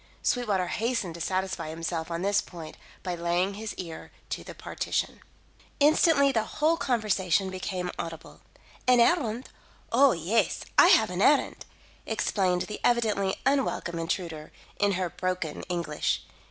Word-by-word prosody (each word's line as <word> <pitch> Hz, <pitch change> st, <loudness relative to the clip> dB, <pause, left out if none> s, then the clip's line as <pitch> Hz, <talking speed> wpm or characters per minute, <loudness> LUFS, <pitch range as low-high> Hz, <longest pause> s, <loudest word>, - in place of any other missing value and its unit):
Sweetwater 210 Hz, -7 st, +1 dB
hastened 220 Hz, -1 st, -1 dB
to 170 Hz, -, -8 dB
satisfy 185 Hz, -2 st, -2 dB
himself 165 Hz, +1 st, -4 dB
on 170 Hz, +1 st, -3 dB
this 200 Hz, +1 st, +3 dB
point 160 Hz, -3 st, -10 dB, 0.3 s
by 180 Hz, -, -2 dB
laying 175 Hz, +3 st, 0 dB
his 215 Hz, +2 st, -6 dB
ear 165 Hz, -3 st, -8 dB, 0.2 s
to -, -, -3 dB
the -, -, -10 dB
partition. -, -, -3 dB, 0.6 s
Instantly 295 Hz, -1 st, +5 dB
the 230 Hz, -4 st, +2 dB, 0.2 s
whole 315 Hz, +2 st, +3 dB
conversation 200 Hz, -, +1 dB
became 185 Hz, -1 st, -3 dB
audible. 165 Hz, -1 st, -7 dB, 0.5 s
"An 250 Hz, -1 st, +6 dB
errand? 240 Hz, -3 st, +2 dB, 0.4 s
Oh, 265 Hz, +2 st, +6 dB
yes, 180 Hz, +8 st, 0 dB
I -, -, +8 dB
have -, -, +5 dB
an -, -, -2 dB
errand!" -, -, +3 dB, 0.4 s
explained 180 Hz, -3 st, +1 dB
the 210 Hz, -, -7 dB
evidently 215 Hz, -5 st, +2 dB
unwelcome 265 Hz, -11 st, 0 dB
intruder, 165 Hz, -2 st, -3 dB, 0.3 s
in 205 Hz, -1 st, +3 dB
her 185 Hz, 0 st, -1 dB
broken 185 Hz, -4 st, -3 dB
English. 170 Hz, -4 st, -1 dB
190 Hz, 140 wpm, -27 LUFS, 170-230 Hz, 0.6 s, I